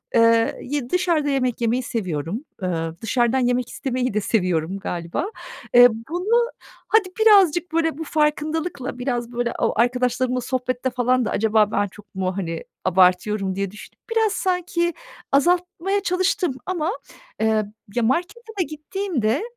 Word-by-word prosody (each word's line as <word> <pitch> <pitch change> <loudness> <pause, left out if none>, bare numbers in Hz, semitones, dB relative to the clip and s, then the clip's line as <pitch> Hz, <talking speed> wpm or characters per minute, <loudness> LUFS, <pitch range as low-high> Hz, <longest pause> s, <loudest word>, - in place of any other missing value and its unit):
eee, 230 0 +4
y 265 -2 -3
dışarıda 340 -5 +1
yemek 255 -3 0
yemeyi 240 +2 +1
seviyorum. 190 - -3 0.2
Iıı, 165 -3 -2
dışarıdan 240 +3 +1
yemek 245 -1 +1
istemeyi 255 -3 -2
de 210 - +1
seviyorum 180 -4 0
galiba. 175 - -3 0.5
Eee, 245 0 +9 0.2
bunu 455 +8 +1 0.4
hadi 420 -4 +3
birazcık, 365 -6 +5
böyle, 325 -2 +1
bu 320 - -4
farkındalıkla, 300 -2 -1
biraz, 245 -2 -2
böyle, 240 0 -1
o - - +1
arkadaşlarımla 250 +1 +1
sohbette 255 0 -2
falan 250 0 +1
da: - - -2
"Acaba 215 -1 +2
ben 205 - +1
çok 200 0 -17
mu, 185 0 -2
hani, 165 -3 -3 0.2
abartıyorum?" 185 +2 +3
diye 195 -1 -2
düşünüp 210 - -13
biraz 445 -2 +2
sanki 360 -2 0 0.4
azaltmaya 355 +6 +1
çalıştım 365 -4 +1
ama, 350 -1 -1 0.5
eee, 220 -1 +2 0.3
ya, 240 - +1
markete 350 - 0 0.2
da - - +4
gittiğimde, 305 - -2
250 Hz, 140 wpm, -22 LUFS, 215-335 Hz, 0.5 s, Eee